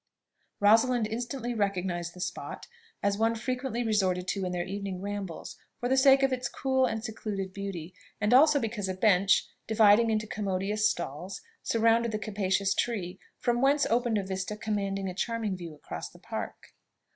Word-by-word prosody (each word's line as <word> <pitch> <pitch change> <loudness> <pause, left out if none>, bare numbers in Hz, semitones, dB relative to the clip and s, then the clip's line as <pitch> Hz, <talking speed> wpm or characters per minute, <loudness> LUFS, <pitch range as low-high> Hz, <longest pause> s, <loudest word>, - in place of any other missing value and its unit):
Rosalind 225 +3 +4
instantly 240 +2 -3
recognised 185 -5 -1
the - - -11
spot 180 0 -5 0.4
as 200 0 +1
one 225 +1 +2
frequently 250 0 -2
resorted 190 -5 +1
to 195 - -1
in 180 - -2
their 175 -1 -2
evening 195 -1 -4
rambles, 200 -3 -5 0.2
for 245 - -1
the 265 - +4
sake 270 0 +6
of 270 -1 +3
its 250 -1 -2
cool 265 -1 +1
and 225 -2 -3
secluded 205 -4 -4
beauty, 190 -4 -6 0.3
and 210 +3 +2
also 295 +3 +7
because 215 -5 -3
a 185 - -2
bench, 190 -1 +4 0.2
divided 220 +1 +5
into 215 -1 0
commodious 210 +1 0
stalls, 175 +4 -5 0.2
surrounded 230 0 +2
the 215 - -1
capacious 200 -2 0
tree, 190 -7 -2 0.2
from 240 -1 0
whence 280 +2 +4
opened 235 -1 +2
a 200 - 0
vista 190 +2 -4
commanding 200 -2 -2
a 185 - -3
charming 225 0 -2
view 170 -4 -8
across 150 - -7
the - - -17
Park. - - -7
210 Hz, 170 wpm, -29 LUFS, 190-235 Hz, 0.4 s, also